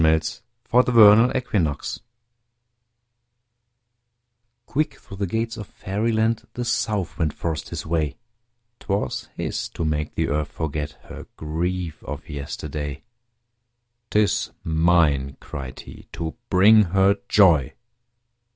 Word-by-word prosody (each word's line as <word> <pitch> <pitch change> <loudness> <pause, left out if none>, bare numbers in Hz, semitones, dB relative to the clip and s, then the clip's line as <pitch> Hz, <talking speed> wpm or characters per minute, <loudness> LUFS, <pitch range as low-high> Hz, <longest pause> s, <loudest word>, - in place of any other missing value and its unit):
OUT 80 0 +2 0.3
OF 125 +1 +6
DOORS 110 +2 +8
Early - - 0
Spring 85 - 0 2.9
Quick 155 +2 -1
through 95 - -12
the 100 0 -1
gates 115 +4 -2
of 105 -3 -7
Fairyland 110 +3 -1
The 120 - -3
South 110 -7 -1
Wind 80 -3 0
forced 80 -2 -3
his 80 -3 -5
way. 80 -3 -1 0.6
'Twas 100 +1 -2
his - - -3
to 85 - -4
make 75 -1 -2
the - - 0
Earth 75 +1 -1
forget 75 -1 -3
Her - - -10
grief 85 +1 -3
of 75 0 -7
yesterday. 75 -1 -5 1.1
"'Tis 105 -3 +2
mine," 80 -5 +2
cried 65 -1 -7
he, - - -13
"to 80 -1 -4
bring 105 +3 +6
her 95 +3 +3
joy!" 85 -10 +5
85 Hz, 115 wpm, -23 LUFS, 75-105 Hz, 2.9 s, DOORS